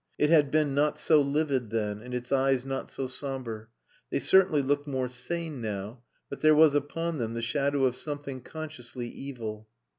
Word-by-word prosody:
It 150 Hz, +1 st, +2 dB
had 150 Hz, -4 st, +5 dB
been 150 Hz, -2 st, +2 dB
not 145 Hz, +2 st, +2 dB
so 155 Hz, -2 st, +4 dB
livid 140 Hz, -4 st, 0 dB
then, 105 Hz, -2 st, -2 dB
and 125 Hz, +2 st, -9 dB
its 125 Hz, 0 st, -4 dB
eyes 135 Hz, -1 st, +2 dB
not 135 Hz, 0 st, -4 dB
so 135 Hz, -, -4 dB
sombre. 130 Hz, -5 st, -5 dB, 0.4 s
They -, -, 0 dB
certainly 185 Hz, -7 st, +4 dB
looked 145 Hz, +2 st, 0 dB
more 130 Hz, -2 st, -1 dB
sane 145 Hz, +3 st, -4 dB
now, 105 Hz, +2 st, -5 dB, 0.3 s
but 140 Hz, -, -8 dB
there 155 Hz, 0 st, +6 dB
was 155 Hz, -1 st, +7 dB
upon 155 Hz, +3 st, -1 dB
them 115 Hz, -1 st, -2 dB
the 115 Hz, -, -2 dB
shadow 140 Hz, +3 st, +1 dB
of 125 Hz, -1 st, +1 dB
something 145 Hz, -2 st, -6 dB
consciously 130 Hz, -5 st, -7 dB
evil. 115 Hz, -5 st, -7 dB
135 Hz, 180 wpm, -28 LUFS, 120-150 Hz, 0.4 s, was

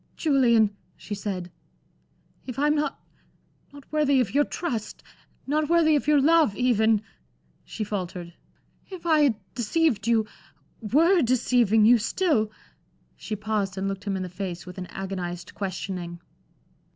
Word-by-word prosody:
"Julian," 235 Hz, -8 st, +3 dB, 0.2 s
she 210 Hz, -, -7 dB
said, 190 Hz, -3 st, -4 dB, 1.0 s
"if 255 Hz, -1 st, -6 dB
I'm 295 Hz, +2 st, +3 dB
not 300 Hz, 0 st, -1 dB, 0.7 s
not 285 Hz, -1 st, -13 dB
worthy 295 Hz, -3 st, +3 dB
of 230 Hz, -6 st, 0 dB
your 290 Hz, +1 st, +3 dB
trust 240 Hz, -, -4 dB, 0.4 s
not 300 Hz, +2 st, 0 dB
worthy 330 Hz, -2 st, +4 dB
of 290 Hz, -, -1 dB
your 300 Hz, -1 st, +5 dB
love, 310 Hz, -6 st, +4 dB
even" 220 Hz, -3 st, +2 dB, 0.6 s
she 220 Hz, -, -5 dB
faltered 180 Hz, -4 st, -5 dB, 0.6 s
"if 370 Hz, -3 st, -9 dB
I 320 Hz, -2 st, +4 dB
had 280 Hz, -6 st, +4 dB, 0.2 s
deceived 240 Hz, -2 st, 0 dB
you 225 Hz, -2 st, +3 dB, 0.6 s
were 330 Hz, -, +3 dB
deceiving 235 Hz, -4 st, +3 dB
you 240 Hz, +1 st, +6 dB
still" 230 Hz, -, +1 dB, 0.7 s
she 215 Hz, -, -5 dB
paused 205 Hz, -2 st, -2 dB
and 195 Hz, +1 st, -2 dB
looked 195 Hz, +1 st, -5 dB
him 195 Hz, -2 st, -1 dB
in 185 Hz, -, -3 dB
the -, -, -4 dB
face 180 Hz, -1 st, -6 dB
with 180 Hz, +1 st, -9 dB
an 180 Hz, -, -6 dB
agonized 180 Hz, -2 st, -6 dB
questioning. 180 Hz, -3 st, -5 dB
225 Hz, 140 wpm, -25 LUFS, 195-290 Hz, 1.0 s, you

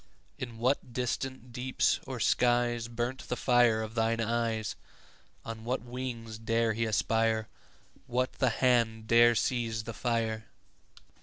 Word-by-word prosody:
In 120 Hz, -3 st, -6 dB
what 125 Hz, +1 st, 0 dB
distant 125 Hz, 0 st, -3 dB
deeps 130 Hz, +2 st, +1 dB
or 130 Hz, -2 st, -5 dB
skies 120 Hz, 0 st, +2 dB
5 120 Hz, -, -14 dB
Burnt 120 Hz, +3 st, -3 dB
the 125 Hz, -, 0 dB
fire 120 Hz, -3 st, +3 dB
of 110 Hz, 0 st, -7 dB
thine 115 Hz, 0 st, +1 dB
eyes? 115 Hz, -1 st, -1 dB, 0.7 s
On 115 Hz, -1 st, -6 dB
what 125 Hz, +1 st, -2 dB
wings 120 Hz, -3 st, -6 dB
dare 115 Hz, 0 st, +1 dB
he 115 Hz, +1 st, 0 dB
aspire? 110 Hz, 0 st, +1 dB, 0.6 s
What 125 Hz, +1 st, 0 dB
the 130 Hz, -, +4 dB
hand 115 Hz, -2 st, +2 dB
dare 120 Hz, +1 st, +6 dB
seize 115 Hz, -2 st, 0 dB
the 115 Hz, -, -6 dB
fire? 115 Hz, -2 st, -1 dB
115 Hz, 140 wpm, -30 LUFS, 115-125 Hz, 0.7 s, dare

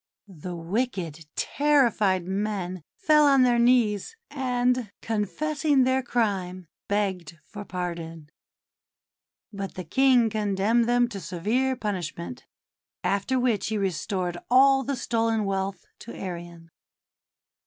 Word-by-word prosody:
The 180 Hz, -1 st, -8 dB
wicked, 170 Hz, -, -3 dB
terrified 235 Hz, -11 st, +2 dB
men 190 Hz, -2 st, -3 dB
fell 300 Hz, -1 st, +4 dB
on 275 Hz, -2 st, +5 dB
their 240 Hz, -1 st, +3 dB
knees, 235 Hz, -, +2 dB, 0.2 s
and, 250 Hz, -4 st, 0 dB
confessing 285 Hz, -, +1 dB
their 260 Hz, +1 st, +2 dB
crime, 195 Hz, -7 st, -1 dB, 0.2 s
begged 190 Hz, -5 st, -2 dB
for 205 Hz, -1 st, -8 dB
pardon. 170 Hz, -4 st, -5 dB, 1.2 s
But 195 Hz, -1 st, -6 dB
the 185 Hz, -, -5 dB
King 250 Hz, +3 st, +3 dB
condemned 210 Hz, +2 st, +1 dB
them 245 Hz, 0 st, +3 dB
to 205 Hz, -4 st, -6 dB
severe 220 Hz, +10 st, -1 dB
pun 210 Hz, -4 st, -2 dB
ishment; 170 Hz, -5 st, -6 dB, 0.6 s
after 200 Hz, +8 st, 0 dB
which 240 Hz, -5 st, +1 dB
he 220 Hz, -, -1 dB
restored 185 Hz, -2 st, -2 dB
all 270 Hz, +2 st, +6 dB
the 280 Hz, +2 st, -2 dB
stolen 225 Hz, -3 st, 0 dB
wealth 195 Hz, -1 st, -3 dB
to 235 Hz, -, -9 dB
Arion. 170 Hz, -2 st, -8 dB
210 Hz, 115 wpm, -26 LUFS, 185-250 Hz, 1.2 s, all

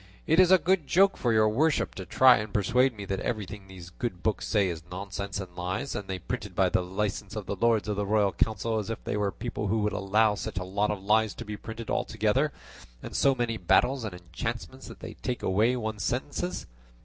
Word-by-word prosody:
It 160 Hz, +3 st, +3 dB
is 185 Hz, -1 st, +7 dB
a 190 Hz, -, +8 dB
good 175 Hz, -2 st, +1 dB
joke 195 Hz, +2 st, +4 dB
for 120 Hz, -, 0 dB
your 110 Hz, -1 st, +4 dB
worship 145 Hz, +9 st, +1 dB
to 95 Hz, -2 st, -7 dB
try 130 Hz, -1 st, +6 dB
and 105 Hz, 0 st, -4 dB
persuade 120 Hz, +5 st, +2 dB
me 100 Hz, -, -6 dB
that 95 Hz, 0 st, -2 dB
everything 105 Hz, -3 st, -4 dB
these 90 Hz, -2 st, -11 dB
good 90 Hz, -2 st, -5 dB
books 110 Hz, -2 st, 0 dB
say 105 Hz, -3 st, +2 dB
is 85 Hz, -3 st, -4 dB
nonsense 100 Hz, +1 st, -5 dB
and 90 Hz, -2 st, -8 dB
lies, 95 Hz, +10 st, -3 dB
and 100 Hz, -, -5 dB
they 95 Hz, -, -3 dB
printed 90 Hz, +2 st, -5 dB
by 95 Hz, 0 st, +3 dB
the 90 Hz, -, +2 dB
license 100 Hz, +3 st, -3 dB
of 105 Hz, -2 st, -4 dB
the -, -, -3 dB
Lords 115 Hz, +1 st, +2 dB
of 105 Hz, -1 st, -2 dB
the 105 Hz, -, 0 dB
Royal 105 Hz, -1 st, +3 dB
Council, 110 Hz, +2 st, 0 dB
as 105 Hz, -, -5 dB
if 115 Hz, -, -5 dB
they -, -, -2 dB
were 105 Hz, -1 st, 0 dB
people 105 Hz, +2 st, -4 dB
who 105 Hz, +2 st, +1 dB
would 105 Hz, 0 st, 0 dB
allow 105 Hz, +2 st, +2 dB
such 105 Hz, 0 st, -5 dB
a 90 Hz, -, -1 dB
lot 100 Hz, +3 st, 0 dB
of 100 Hz, -2 st, -3 dB
lies 110 Hz, +1 st, +2 dB
to 120 Hz, -, -7 dB
be 105 Hz, 0 st, -5 dB
printed 110 Hz, +2 st, -7 dB
all -, -, +1 dB
together, 110 Hz, +7 st, +1 dB, 0.5 s
and -, -, -7 dB
so 135 Hz, -1 st, +4 dB
many 120 Hz, -2 st, -1 dB
battles 125 Hz, +8 st, +2 dB
and 105 Hz, -5 st, -5 dB
enchantments 115 Hz, +9 st, -6 dB
that -, -, -11 dB
they -, -, -7 dB
take 125 Hz, -1 st, -4 dB
away 110 Hz, +6 st, +2 dB
one's 110 Hz, -3 st, -3 dB
senses." 145 Hz, -, -2 dB
105 Hz, 230 wpm, -28 LUFS, 95-120 Hz, 0.5 s, a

